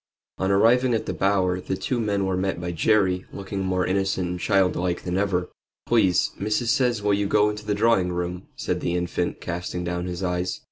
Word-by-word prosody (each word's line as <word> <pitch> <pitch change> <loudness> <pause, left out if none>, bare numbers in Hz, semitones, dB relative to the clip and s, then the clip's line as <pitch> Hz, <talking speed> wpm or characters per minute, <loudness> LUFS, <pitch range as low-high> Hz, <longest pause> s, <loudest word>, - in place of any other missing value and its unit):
On 95 - 0
arriving 120 +5 +4
at 110 - -2
the - - -3
Bower 95 -2 +1
the 95 - -3
two 125 - -2
men 100 -3 0
were 95 -1 0
met 95 -1 -1
by 90 0 -3
Jerry, 95 +1 +2
looking 100 0 -5
more 95 -1 0
innocent 95 -1 0
and 90 0 -4
child 95 0 +2
like 90 0 -2
than 90 -1 -2
ever. 95 -2 0 0.3
"Please, 100 -7 +3
missus 105 +3 0
says 125 -6 +1
will 105 0 +2
you 100 0 +1
go 105 +1 +3
into 105 0 -9
the 105 - +1
drawing 105 -4 +2
room?" 90 +1 -4
said - - -2
the 85 - -1
infant, 90 0 -2
casting 90 +1 -4
down 90 0 -2
his 90 +1 -4
eyes. 90 0 -1
95 Hz, 205 wpm, -24 LUFS, 90-105 Hz, 0.3 s, arriving